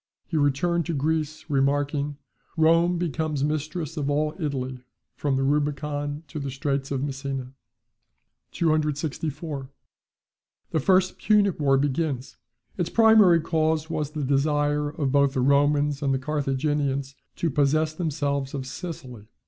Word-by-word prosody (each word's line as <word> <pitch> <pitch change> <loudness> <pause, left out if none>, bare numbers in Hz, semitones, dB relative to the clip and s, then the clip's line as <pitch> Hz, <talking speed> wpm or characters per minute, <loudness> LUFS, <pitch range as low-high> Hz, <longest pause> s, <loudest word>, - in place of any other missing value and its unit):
He 165 - -6
returned 160 +4 +1
to 170 - -1
Greece, 155 +1 -1
remarking, 145 0 0 0.4
"Rome 165 +2 +4
becomes 155 -4 -1
mistress 155 +2 -2
of 145 -2 -1
all 150 +1 +1
Italy 130 -5 -3 0.3
from 140 -2 0
the 135 - +1
Rubicon 145 +1 -1
to 155 - -5
the 140 -1 -4
Straits 135 0 -2
of 135 -1 -2
Messina." 135 -2 -4 1.0
264. 155 -2 -1 1.0
The 160 - +1
first 185 +4 +2
Punic 205 -4 +3
war 135 -2 +3
begins. 140 -1 -1 0.4
Its 175 -1 0
primary 215 -7 +6
cause 160 0 0
was 150 -3 -2
the 150 -2 -3
desire 145 +2 +1
of 145 -2 -2
both 140 -1 +3
the 130 - +1
Romans 145 +1 +3
and 140 -2 +1
the 135 - +2
Carthaginians 140 -1 -1 0.2
to 165 - -1
possess 155 +3 +2
themselves 145 -4 -2
of 135 -2 -4
Sicily. 130 - -8
145 Hz, 130 wpm, -25 LUFS, 140-160 Hz, 1.0 s, primary